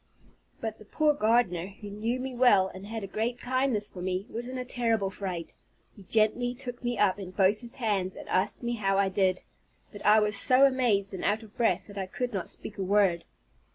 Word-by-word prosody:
But 220 -1 -5
the 215 - -13
poor 305 +7 +2
gardener, 215 -8 +2
who 205 -2 -8
knew 225 +5 -2
me 260 0 -4
well, 225 -7 +4
and 190 +2 -9
had 225 -1 -5
a - - -4
great 225 +5 -2
kindness 255 -4 0
for 180 - -9
me, 185 +1 -2
was 240 +2 -5
in 260 - -5
a 250 - -4
terrible 225 -6 0
fright; 180 -4 -5 0.4
he 205 - -14
gently 240 +3 +2
took 245 -1 -7
me 240 -1 -1
up 205 -1 +2
in 190 -2 -6
both 195 +2 +2
his 235 -1 -3
hands, 200 -6 -1
and - - -10
asked 185 +6 0
me 240 0 -1
how 195 -4 0
I 195 -1 +3
did; 185 -1 +1 0.5
but 205 - -10
I 210 +1 +6
was 210 -1 +1
so 255 +6 +5
amazed 235 -7 +2
and 190 - -5
out 215 +2 +1
of 215 -1 -16
breath, 225 -7 +1
that 205 -1 -8
I 190 - -3
could 245 +5 -3
not 185 -4 -3
speak 210 - -7
a - - 0
word. 190 -3 +2
210 Hz, 225 wpm, -28 LUFS, 195-240 Hz, 0.5 s, I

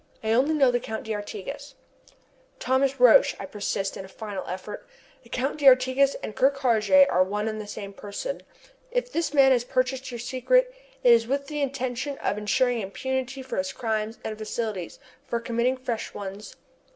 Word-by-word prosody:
"I 220 - 0
only 270 +7 +3
know 270 -4 +4
the 245 - +1
Count 220 +2 -5
d'Artigas." 220 +6 -6 0.8
"Thomas 265 +1 +1
Roch," 245 -2 +6
I - - -5
persist, 195 -1 -3
in - - -6
a - - -10
final 200 -1 -6
effort, 185 +3 -7 0.3
"the 235 - -20
Count 270 +5 -2
d'Artigas 265 0 +5
and 215 - -5
Ker 265 - +5
Karraje 270 -1 +4
are 180 - +2
one 210 +3 -2
and 215 -1 -3
the 210 - -9
same 200 -1 -7
person. 210 - -5 0.5
If - - -2
this 335 - -1
man 275 -2 +6
has 245 -2 +3
purchased 255 +1 -1
your 240 - -5
secret, 265 - +1 0.3
it 245 - +8
is 230 -1 +3
with 280 +2 -1
the 295 0 -4
intention 270 0 -2
of 205 - -2
ensuring 245 +3 +1
impunity 260 +6 -3
for 260 - -5
his 185 0 -1
crimes 220 0 -2
and 220 - -4
facilities 215 -4 -4 0.3
for 235 - -1
committing 235 +2 0
fresh 245 -3 -4
ones. 200 +1 -7
245 Hz, 175 wpm, -26 LUFS, 215-270 Hz, 0.8 s, it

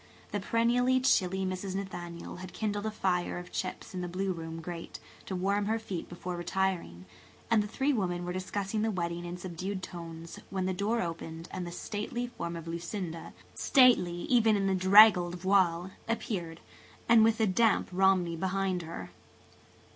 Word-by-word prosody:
The 205 - -1
perennially 240 +5 +2
chilly 190 -7 +2
Mrs. 185 +1 -3
Nathaniel 175 -4 -6
had 185 0 -9
kindled 205 -1 -2
a - - +1
fire 185 -5 -1
of 175 0 -8
chips 185 - -4
in 180 - -3
the 180 - -3
blue 185 +2 -1
room 165 -1 -6
grate 170 0 -7 0.3
to 190 - -3
warm 200 +2 0
her 220 +1 +1
feet 200 -6 -5
before 175 +1 -5
retiring, 175 - -2 0.5
and 225 -2 +5
the 210 - -3
three 270 +6 0
women 175 -6 -1
were 180 - -3
discussing 195 +3 -2
the 220 - +1
wedding 175 -3 -2
in 175 +1 -5
subdued 185 +2 -5
tones 165 -2 -8
when 190 -1 -2
the 190 - 0
door 205 +5 0
opened 165 0 -6
and 180 -1 -4
the - - -6
stately 210 +6 -4
form 170 -8 -5
of 165 -1 -7
Lucinda, 170 0 -5 0.2
stately 235 -10 +4
even 225 -2 +4
in 200 -1 0
the 195 - +2
draggled 190 -1 +7
voile, 180 -1 +2 0.2
appeared, 175 -8 -3 0.5
with 225 -1 +6
the 220 - +3
damp 215 +3 +3
Romney 185 -2 +3
behind 190 +1 -1
her. 165 0 -7
185 Hz, 170 wpm, -30 LUFS, 175-205 Hz, 0.5 s, draggled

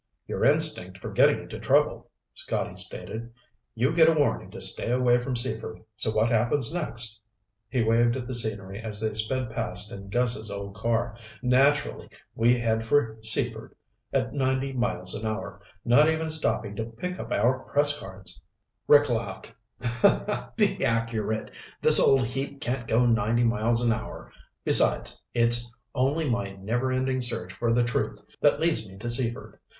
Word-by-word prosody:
"Your - - -3
instinct - - +2
for - - -7
getting - - +4
into - - -9
trouble," - - +1 0.2
Scotty - - -4
stated. 115 +2 -7 0.4
"You 130 +7 +1
get 165 -1 +6
a 160 -2 +2
warning 145 - 0
to - - -9
stay - - +4
away 125 0 +3
from 125 +1 -3
Seaford, 120 -2 -4
so 110 +1 -1
what 110 +1 +1
happens 120 +6 0
next?" 120 -10 -4 0.5
He 125 -2 0
waved 115 +2 +3
at 125 - -5
the 130 - -4
scenery 105 -4 -1
as 110 -2 -5
they 110 0 -2
sped 115 +3 -2
past 105 -1 -2
in 100 -3 -9
Gus's 115 -1 0
old 100 0 -6
car. 115 +2 -1 0.3
"Naturally 140 +3 +2 0.2
we 120 +2 +3
head 115 -1 0
for 115 -2 +1
Seaford 110 -1 -1 0.4
at - - -1
ninety 130 0 -1
miles 105 -8 -1
an 105 - -5
hour, 110 0 -5 0.2
not 145 +6 +5
even 160 0 -1
stopping 110 -9 0
to 110 - -2
pick 150 +12 -6
up - - -7
our 130 +2 +2
press 145 +2 0
cards." 95 -3 -10 0.5
Rick 145 0 +6
laughed. 110 -5 -4 1.0
"Be - - +1
accurate. 115 -1 -1 0.3
This - - +8
old 135 -1 +5
heap 135 +3 -4
can't 125 -2 -3
go 120 +3 +3
ninety 115 0 +2
miles 115 +1 +1
an 115 - +3
hour. 110 - -5 0.3
Besides, - - +3
it's 120 0 +2 0.2
only 145 +5 0
my 115 -6 -2
never 115 +7 -2
ending 130 0 0
search 115 -7 -1
for 120 -1 -1
the 120 +1 +3
truth 120 - -2 0.2
that - - +4
leads 155 - 0
me 95 - -13
to 115 +4 -6
Seaford. 120 0 -1
120 Hz, 165 wpm, -26 LUFS, 110-130 Hz, 1.0 s, This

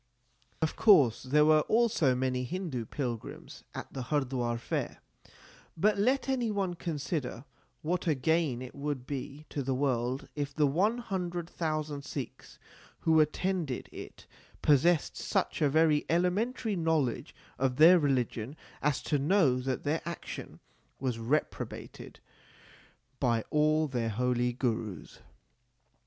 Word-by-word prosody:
Of 160 - 0
course 145 - +5
there 150 +3 +3
were 155 0 +6
also 220 - +3
many 125 0 0
Hindu 155 -5 -3
pilgrims 120 -6 -5
at - - -7
the 130 -2 -4
Hardwar 125 -5 0
fair, 115 - -3 0.8
but 205 +4 +2
let 260 +7 +2
any 255 -4 0
one 195 -4 -1
consider 150 -6 -4 0.4
what 175 +3 -1
a 155 - +3
gain 140 -2 +1
it 125 - -9
would 140 -3 -4
be 140 +2 -6
to 145 - -2
the 135 0 -1
world 130 -1 -1
if 145 -1 -3
the 150 - +3
one 190 - +2
hundred 180 -7 -3
thousand 155 -4 -3
Sikhs 135 -4 -7
l - - -24
who 160 -1 +4
attended 155 -2 0
it - - -10 0.4
possessed 150 +3 +3
such - - -1
a 150 - +4
very 155 0 +3
elementary 200 +6 +1
knowledge 160 -8 0 0.2
of 130 -1 +1
their 170 +5 +8
religion 130 -3 -1 0.3
as 145 -3 0
to 145 -2 0
know 145 -4 +3
that 130 0 -2
their 150 +3 0
action 170 0 -7 0.4
was 125 -3 -2
reprobated 135 +7 -3 1.0
by 115 -4 +1
all 155 +1 +3
their 120 -4 -1
holy 125 +2 +1
Gurus. 115 -5 -3
150 Hz, 135 wpm, -30 LUFS, 130-170 Hz, 1.0 s, their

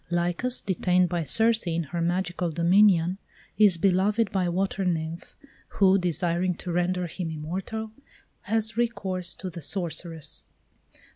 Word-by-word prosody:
Lycus, 175 +9 0
detained 180 -1 +1
by 175 0 -1
Circe 220 - +2
in 170 0 0
her 170 +3 -4
magical 175 0 -1
dominion, 175 +2 +3 0.4
is 205 -5 +6
beloved 195 +5 +2
by 190 -2 0
a 175 - 0
Water 195 +2 -1
Nymph, 165 -1 -3 0.4
who, 195 0 +5
desiring 175 0 0
to 180 - -6
render 180 +1 0
him 170 0 -5
immortal, 190 +8 -5 0.5
has 220 +1 -1
recourse 190 -7 -1
to 185 -1 -6
the 170 0 -8
Sorceress. 160 - -4
180 Hz, 135 wpm, -26 LUFS, 170-195 Hz, 0.5 s, is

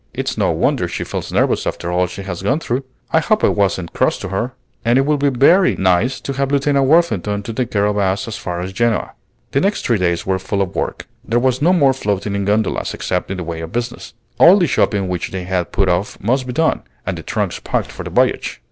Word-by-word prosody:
it's - - -2
no - - +1
wonder - - +1
she - - -4
feels - - -5
nervous - - +1
after 85 - -3
all 90 +1 +2
she 100 +2 -8
has 95 -2 -5
gone 130 +10 +1
through. 130 -3 -2 0.3
I 160 - +4
hope 215 +7 +1
I - - +5
wasn't 95 -4 0
cross - - +1
to 100 - -6
her! 105 +7 -2 0.3
And 120 +2 +3
it 135 - +3
will 150 0 +2
be 140 0 +3
very 165 +9 +4
nice 95 +7 +1
to 140 - -4
have 135 0 -1
Lieutenant 140 -1 +2
Worthington 105 - +2
to 115 - -5
take 125 0 -2
care 100 -1 +1
of 105 0 0
us 95 +1 0
as 110 - -4
far 90 -7 -4
as 95 +1 -5
Genoa." 115 +1 0 0.4
The 140 - +2
next 200 +2 0
three 115 -4 +2
days 85 -2 0
were 95 -1 0
full 100 +1 -1
of 90 - -6
work. - - -3 0.2
There 115 - 0
was 130 +1 +1
no 170 +4 +4
more 140 -7 +4
floating 100 -5 -2
in 100 0 -1
gondolas, 105 +1 0
except 90 -1 -2
in 95 - -3
the 90 - -4
way 85 0 -5
of 80 +3 -7
business. 120 0 -4 0.2
All 180 +4 +8
the 180 - +3
shopping 100 - +1
which 90 -2 -3
they 95 -1 -5
had 90 -1 -2
put 100 -1 +1
off 90 +3 -1
must 125 +5 0
be 125 - -4
done, 160 +4 +1 0.2
and - - -2
the - - -7
trunks - - -2
packed - - -2
for - - -8
the - - -6
voyage. - - +1
105 Hz, 245 wpm, -18 LUFS, 95-135 Hz, 0.4 s, All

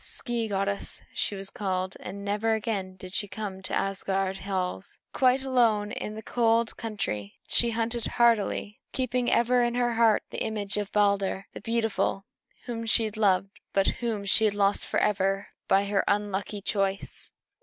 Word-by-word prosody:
"Skee 235 -2 -2
goddess," 200 0 -2
she 205 - -1
was 195 0 -4
called; 185 -2 -2
and 200 +1 -7
never 210 +2 +1
again 200 -4 -3
did 185 0 -10
she 205 - +2
come 195 -2 -6
to 190 - -1
Asgard 195 0 -1
halls. 185 - -3
Quite 260 0 +3
alone 230 -6 +2
in 210 - -4
the 220 - -7
cold 230 0 +2
country, 195 - -4
she 235 - +3
hunted 230 +1 -1
hardily, 225 -3 +2
keeping 250 -1 0
ever 245 +1 +4
in 240 0 0
her 245 -1 +1
heart 225 -2 +4
the - - -5
image 210 -2 -2
of 205 -1 -3
Balder 200 -2 +2
the - - -8
beautiful, 225 -3 0 0.4
whom 230 -2 -4
she 225 -1 +3
loved, 195 -3 +2 0.2
but 195 0 +3
whom 220 -4 -2
she 220 +2 +5
had 205 -1 +2
lost 200 0 +2
forever 195 -1 +1 0.2
by 195 +1 +4
her 200 -1 +1
unlucky 205 0 -1
choice. 195 -1 -2
205 Hz, 160 wpm, -27 LUFS, 195-230 Hz, 0.4 s, she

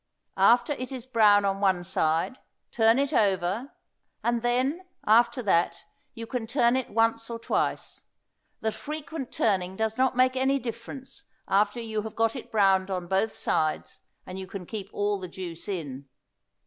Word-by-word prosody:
After 240 +4 +5
it 255 -1 -6
is 255 -3 -6
brown 210 -5 +5
on 195 0 0
one 190 -3 +2
side, 165 +5 0 0.3
turn 225 +1 +4
it 280 0 0
over; 200 +5 +1 0.5
and 235 -1 +1
then, 255 +8 0 0.2
after 235 +3 +4
that, 175 -4 +1 0.3
you 230 - -6
can 235 -1 -4
turn 240 0 +3
it 260 -1 -1
once 225 +1 +1
or 230 - -4
twice; 230 - -2 0.6
the 220 - 0
frequent 300 0 -6
turning 190 -3 0
does 220 +3 -2
not 260 -1 +2
make 255 0 +4
any 265 +1 +2
difference 250 +2 -7 0.2
after 205 +4 +2
you 220 -2 -3
have 220 0 -7
got 225 +1 +1
it 255 - -8
browned 195 -3 +3
on 180 -2 -2
both 195 +5 0
sides 155 0 -1 0.2
and 185 +1 -7
you 190 - -7
can 190 -1 -7
keep 200 0 -6
all 205 0 0
the 185 - -5
juice 170 -2 -7
in. 140 -8 -5
220 Hz, 165 wpm, -27 LUFS, 190-245 Hz, 0.6 s, After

